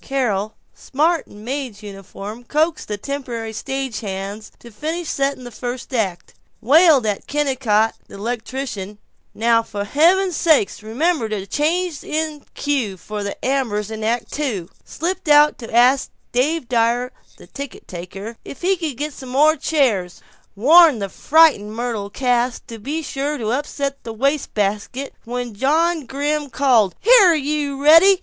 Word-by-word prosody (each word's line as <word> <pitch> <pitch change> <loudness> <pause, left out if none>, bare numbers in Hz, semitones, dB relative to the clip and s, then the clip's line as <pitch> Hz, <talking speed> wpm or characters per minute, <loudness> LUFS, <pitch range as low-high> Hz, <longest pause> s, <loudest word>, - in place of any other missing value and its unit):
Carol, 220 -6 -1 0.2
smart 320 +4 0
in 205 +1 -13
maid's 255 -4 -5
uniform, 200 +3 -9
coaxed 310 +5 0
the 210 - -3
temporary 235 -2 -5
stage 265 -1 -4
hands 200 +1 -6
to 235 - -14
finish 320 +9 -4
setting 275 -1 -1
the 245 - -8
first 245 +3 -6
act, 190 -7 -2 0.3
wailed 295 0 +5
at 205 -2 -2
Kennicott, 260 -7 +1
the - - -12
electrician, 220 -2 -5 0.4
"Now 230 +1 +3
for 210 -3 -5
heaven's 345 - +3
sake 310 - +3
remember 240 +3 0
the 205 -3 -3
change 320 - -1
in 310 -1 -3
cue 260 -10 -1
for 210 +3 -6
the 200 0 -4
ambers 230 -6 -1
in 220 0 -5
Act 230 +2 -1
Two," 220 - -3
slipped 340 +2 -4
out 295 0 +6
to 230 - -9
ask 250 +4 +4 0.2
Dave 270 +3 0
Dyer, 240 +1 +1 0.3
the - - -14
ticket 280 -3 -9
taker, 195 +6 -8
if - - -10
he 380 +1 +2
could 310 -7 -4
get 295 +1 -3
some 260 -2 -10
more 300 +5 +4
chairs, 230 - 0 0.4
warned 305 - +6
the 200 -1 -3
frightened 275 - +3
Myrtle 230 -4 -3
Cass 245 +1 0
to 230 -1 -9
be 300 +9 -4
sure 290 +1 -3
to 220 -4 -3
upset 280 +1 -3
the 225 - -6
waste 275 +6 -1
basket 210 +6 -2
when 245 0 -4
John 310 +6 +1
Grimm 290 +1 -2
called, 235 -7 +3
"Here 415 -7 +6
you, 290 -1 -2
Reddy." 335 +6 +7
255 Hz, 155 wpm, -20 LUFS, 220-295 Hz, 0.4 s, Reddy